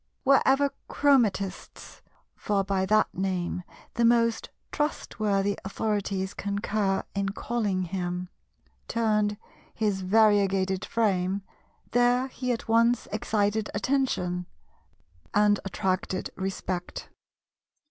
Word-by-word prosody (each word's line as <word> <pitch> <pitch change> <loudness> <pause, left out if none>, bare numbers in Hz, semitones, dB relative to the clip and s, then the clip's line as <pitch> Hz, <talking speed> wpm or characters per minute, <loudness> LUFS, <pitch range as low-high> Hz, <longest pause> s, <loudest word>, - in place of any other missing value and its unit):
Wherever 275 +1 +4 0.2
Chromatistes,—for 205 -4 -1
by 190 -1 0
that 215 +1 +3
name 185 -1 -2 0.3
the 235 - 0
most 230 -1 +3 0.2
trustworthy 205 -9 -1
authorities 200 -1 -2
concur 200 -1 -1
in 200 0 -1
calling 205 -3 -1
him,—turned 180 - -3 0.4
his 205 -3 0
variegated 195 -2 +3
frame, 195 -3 0 0.5
there 245 +2 +3
he 255 -1 -3
at 235 - -3
once 230 +2 +3
excited 210 0 0
attention, 195 -7 0 0.9
and 210 0 +4
attracted 185 0 -2
respect. 190 -1 -4
200 Hz, 85 wpm, -27 LUFS, 190-225 Hz, 0.9 s, Wherever